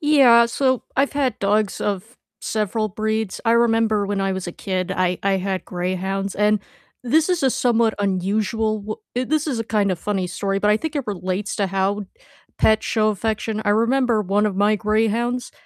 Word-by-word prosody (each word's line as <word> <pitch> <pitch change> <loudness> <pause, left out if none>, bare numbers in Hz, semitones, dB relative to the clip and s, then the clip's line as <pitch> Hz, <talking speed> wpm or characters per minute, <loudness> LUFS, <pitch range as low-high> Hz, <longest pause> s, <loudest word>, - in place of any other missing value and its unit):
Yeah, 265 -6 +6
so 260 +1 0
I've 275 +2 +2
had 270 -5 -1
dogs 205 +1 0
of 205 +4 -3 0.2
several 215 0 -1
breeds, 220 0 -2
I 230 - +3
remember 225 -3 +2
when 200 0 -2
I 195 0 0
was 190 -1 -4
a - - -6
kid, 185 -1 -3
I 180 -1 0
I 195 -1 +2
had 190 0 -3
greyhounds, 185 +2 -3
and 210 +1 +2 0.5
this 310 +7 +3
is 360 -2 0
a 265 - +4
somewhat 235 -4 +2
unusual 210 +3 0
w 215 +1 -5 0.2
uh, 250 - +1
this 310 0 +1
is 265 -6 -2
a - - -3
kind 205 -3 +1
of 180 - -4
funny 195 -3 -2
story, 195 +2 -2
but 210 +1 +2
I 210 - +4
think 315 +5 -4
it 280 - -2
relates 190 0 -3
to 200 -2 0
how 195 +2 -1 0.5
pets 220 0 +3
show 215 -1 +1
affection, 215 +1 -2
I 205 - +2
remember 230 +1 +2
one 205 +2 +1
of 200 -3 -2
my 205 +2 +3
greyhounds 225 +4 0
215 Hz, 190 wpm, -21 LUFS, 195-235 Hz, 0.5 s, Yeah